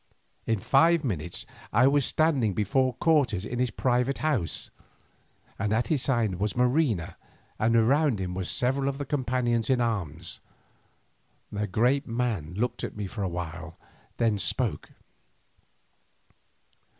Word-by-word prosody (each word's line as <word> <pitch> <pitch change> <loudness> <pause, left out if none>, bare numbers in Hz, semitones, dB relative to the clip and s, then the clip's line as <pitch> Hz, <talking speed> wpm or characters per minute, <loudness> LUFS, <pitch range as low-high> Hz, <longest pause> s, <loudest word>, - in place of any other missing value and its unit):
In 110 -2 +1
five 165 - +4
minutes 85 - -2 0.3
I - - +4
was 140 -1 +3
standing 135 - +2
before 125 +5 +1
Cortes 130 - +2
in 120 +3 -4
his 125 0 +1
private 125 +4 0
house. 140 - -1 0.9
At 110 +3 0
his 150 -5 +1
side 115 -9 0
was 105 -1 -1
Marina 125 - +1 0.4
and 115 +2 +2
around 135 +3 +3
him 90 -2 -3
were 95 +1 -3
several 135 +7 0
of 135 - -4
his 145 - -4
companions 120 -4 0
in 130 -2 +3
arms. 105 -11 -2 1.1
The 105 0 -2
great 125 +8 +1
man 115 -9 -2
looked 120 +3 -2
at - - -4
me 105 - -3
for 100 +2 -6
a 95 - -1
while, 85 -1 -6 0.4
then 110 -3 +1
spoke. - - -2
120 Hz, 135 wpm, -27 LUFS, 100-135 Hz, 1.1 s, five